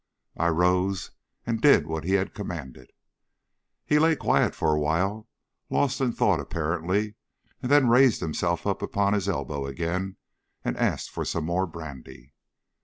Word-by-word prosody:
I 85 - +1
rose 90 +3 +1 0.3
and 115 -1 -2
did 145 +1 +6
what 80 0 -4
he 95 - 0
had 95 0 +1
commanded. 65 -1 -7 1.0
He 150 - +3
lay 160 +1 +4
quiet - - +1
for 80 - +1
a 75 - +1
while, 95 +9 -1 0.4
lost 135 -1 +1
in 130 -2 +2
thought 100 -7 +2
apparently, 85 +7 -1 0.5
and 125 - -3
then 145 -3 +6
raised 125 0 +5
himself 85 +2 -1
up 100 -1 -1
upon 100 0 +1
his 100 -1 0
elbow 70 -7 -3
again, 85 +6 -3 0.5
and - - -1
asked - - -1
for - - -3
some 85 -2 -2
more 90 +3 0
brandy. 70 -5 -10
90 Hz, 155 wpm, -26 LUFS, 80-105 Hz, 1.0 s, did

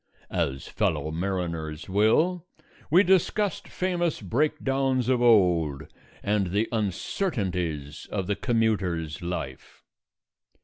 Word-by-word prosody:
As 65 0 -1
fellow 75 - -1
mariners 85 -3 -3
will, 155 - +2 0.4
we 175 +6 +6
discussed 190 +2 +1
famous 175 -3 -1
breakdowns 135 - 0
of 125 -2 +2
old 90 - +4 0.4
and 100 -2 +1
the 100 +5 0
uncertainties 95 - -2
of 95 -3 -1
the 100 +2 0
commuter's 95 -9 0
life. 85 -7 -6
100 Hz, 95 wpm, -26 LUFS, 85-135 Hz, 0.4 s, we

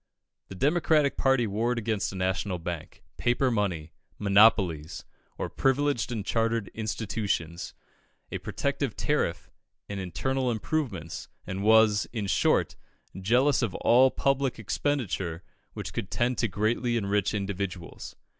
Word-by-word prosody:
The 95 - -9
Democratic 150 - +2
party 135 -3 +3
warred 115 +4 0
against 110 -3 -1
a - - -8
national 95 0 -1
bank, 85 -2 -6
paper 125 +2 +2
money, 90 -8 -1 0.3
"monopolies" 100 -6 +3 0.3
or - - -2
privileged 135 -3 +1
and 110 -4 -3
chartered 115 -2 0
institutions, 105 -6 -3 0.6
a - - -3
protective - - -2
tariff, - - -1 0.4
and 100 -1 -5
internal 130 +8 -1
improvements, 110 - -3 0.2
and 95 +1 -4
was, 110 -1 +5
in 110 -4 -3
short, 95 - +2 0.4
jealous 125 +10 +2
of 110 -8 -1
all 130 +3 +5
public 135 -1 0
expenditure 105 - -2 0.3
which - - -6
could 95 - -4
tend 120 +1 0
to 115 - +2
greatly 115 +5 0
enrich 100 -1 0
individuals. 100 -3 -4
110 Hz, 125 wpm, -28 LUFS, 95-125 Hz, 0.6 s, was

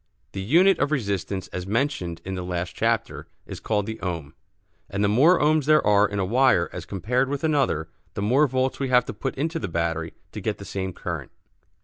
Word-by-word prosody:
The 95 - -5
unit 170 - +4
of 145 +1 +1
resistance, 100 - -2
as 90 0 -5
mentioned 100 - -1
in 95 - -4
the 90 - -3
last 90 -1 -3
chapter, - - -1 0.2
is - - -8
called 105 -2 -1
the 110 +1 -6
ohm, 85 -5 -4 0.6
and 100 +1 -1
the - - +4
more 140 - +5
ohms 150 -1 +3
there 155 +1 +4
are 105 0 +4
in 100 - -4
a 95 - +1
wire 120 -4 +3
as - - -6
compared 125 +7 0
with 145 +1 -3
another, 140 - +1 0.3
the 100 - -2
more 135 +8 +4
volts 130 0 -1
we 135 -1 -1
have 125 -1 +4
to - - -5
put 125 +6 -4
into 160 +4 -2
the - - -3
battery 85 -1 -2 0.2
to - - -7
get - - -2
the - - -10
same 95 -1 -3
current. - - -5
105 Hz, 215 wpm, -24 LUFS, 95-140 Hz, 0.6 s, more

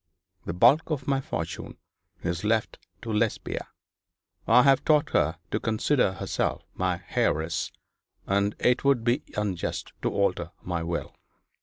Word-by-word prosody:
The 85 - -3
bulk 120 - +5
of 140 -4 -2
my 135 -1 +2
fortune - - -5 0.5
is 85 +1 -2
left 110 0 0 0.2
to 115 - -3
Lesbia. 105 +1 -1 0.8
I 125 +2 +7
have 135 -1 +5
taught 150 -2 +3
her 80 +4 +2
to 110 - 0
consider 115 0 +1
herself - - -2
my - - -1
heiress; 85 +5 0 0.5
and 100 +1 +1
it 125 0 +2
would 140 -4 +3
be 120 +4 +2 0.2
unjust 100 -4 -2
to - - +1
alter 90 -4 0
my 85 -2 -2
will.' 85 +1 -3
110 Hz, 140 wpm, -27 LUFS, 90-125 Hz, 0.8 s, I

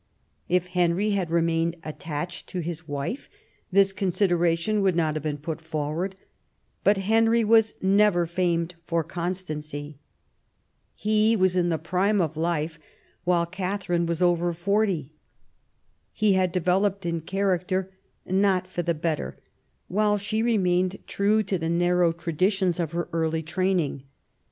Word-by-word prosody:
If 180 0 +1
Henry 180 +3 +1
had 190 -4 0
remained 165 0 +1
attached 155 +2 -5
to 180 - -3
his 165 -1 -6
wife 145 - -4 0.4
this 195 +1 +4
consideration 175 +1 +1
would 190 -3 +2
not 160 -3 +1
have 155 - -3
been 150 0 -2
put 155 +2 -5
forward; 160 +4 -3 0.7
but 205 0 +4
Henry 225 +3 +3
was 225 0 +4
never 195 -2 +4
famed 170 0 0
for 165 -1 +1
constancy. 155 -4 -5 1.0
He 215 +1 +2
was 185 -3 +2
in 175 -1 +2
the 165 - +1
prime 185 +6 +1
of 160 -3 0
life, 165 0 -1 0.5
while 175 -1 +3
Katharine 180 -1 -2
was 170 +1 0
over 175 0 +2
forty. 185 -4 0 1.0
He 215 -2 +3
had 185 -1 +2
developed 190 +2 +1
in 170 -2 -2
char 195 +2 +1
acter, 185 +1 -2 0.4
not 190 -1 +2
for 180 -1 -3
the 170 -1 0
better, 155 -1 -2 0.5
while 210 +2 +2
she 215 +2 -2
remained 185 -5 +1
true 210 +2 +2
to 195 -2 -2
the 165 0 -2
narrow 175 0 +3
traditions 175 +2 0
of 165 -3 -1
her 175 0 -2
early 160 -1 0
training. 170 -5 -1
180 Hz, 140 wpm, -25 LUFS, 165-195 Hz, 1.0 s, this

